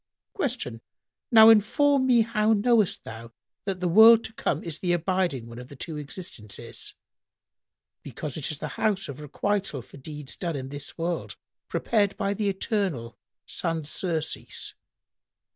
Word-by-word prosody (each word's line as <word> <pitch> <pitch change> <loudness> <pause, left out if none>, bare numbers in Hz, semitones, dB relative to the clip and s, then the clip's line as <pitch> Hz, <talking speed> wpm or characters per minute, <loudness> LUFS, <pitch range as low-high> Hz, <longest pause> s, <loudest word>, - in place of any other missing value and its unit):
Q 245 - -3 0.5
"Now 220 -1 +9
inform 260 +6 +4
me 240 -2 +5
how 220 -1 +2
knowest 220 -2 +2
thou 115 +1 -9 0.3
that 190 -2 -3
the 180 - +1
world 220 +5 +8
to 220 - -7
come 160 -7 -1
is 165 -2 -5
the 175 -2 +1
abiding 175 -7 0
one 115 +1 -9
of 125 - -9
the 140 - -12
two 155 +3 -6
existences?"— 145 - -5 1.1
"Because 150 - -6
it 155 - -3
is 155 - -3
the - - -5
house 195 -3 +1
of 140 -1 -7
requital 150 - -2
for - - -15
deeds 145 0 -7
done 170 -4 -3
in 135 -1 -5
this 145 0 -7
world 170 +1 -3 0.3
prepared 205 -4 +1
by 200 0 0
the 205 0 0
Eternal 190 - -2 0.3
sans 165 -3 -2
surcease." 160 -4 -3
175 Hz, 150 wpm, -26 LUFS, 145-215 Hz, 1.1 s, Now